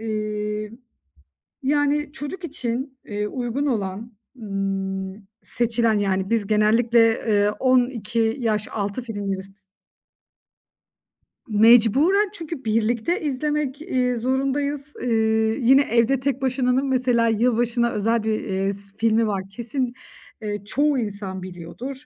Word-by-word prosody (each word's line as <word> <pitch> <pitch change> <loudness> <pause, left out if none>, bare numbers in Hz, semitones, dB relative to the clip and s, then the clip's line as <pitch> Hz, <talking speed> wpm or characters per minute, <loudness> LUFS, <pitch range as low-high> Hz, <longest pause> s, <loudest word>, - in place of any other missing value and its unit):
İii, 215 -1 -3 0.9
yani 290 +1 +1
çocuk 315 +5 -7
için, 260 -3 -4
eee, 210 0 -3
uygun 250 +4 -2
olan, 220 -2 -3 0.3
ımm, 195 -1 -4 0.2
seçilen 230 -2 +1
yani 195 0 0
biz 225 -3 +1
genellikle, 225 +2 +4 0.2
eee, 205 -1 +3
12 240 -3 +1
yaş 215 -2 0
altı 205 +3 -3
filmleri 200 -4 -4
s 195 0 -16 2.0
Mecburen. 245 - +5
Çünkü 330 - -7
birlikte 230 - 0
izlemek, 295 0 -2
iii, 255 -7 0
zorundayız. 275 +3 -1
İii, 220 0 +1
yine 265 +4 +6
Evde 235 +1 +2
Tek 270 0 -1
Başına'nın 260 0 +1
mesela 250 -3 +2
yılbaşına 235 +1 +2
özel 225 +2 0
bir, 220 -1 0
eee 195 0 -1
s 200 0 -7
filmi 225 0 +2
var. 195 -2 -1
Kesin, 245 +3 -3 0.5
eee, 205 -2 -4
çoğu 285 +3 +1
insan 200 -3 -4
biliyordur. 225 - -8
230 Hz, 115 wpm, -23 LUFS, 210-265 Hz, 2.0 s, yine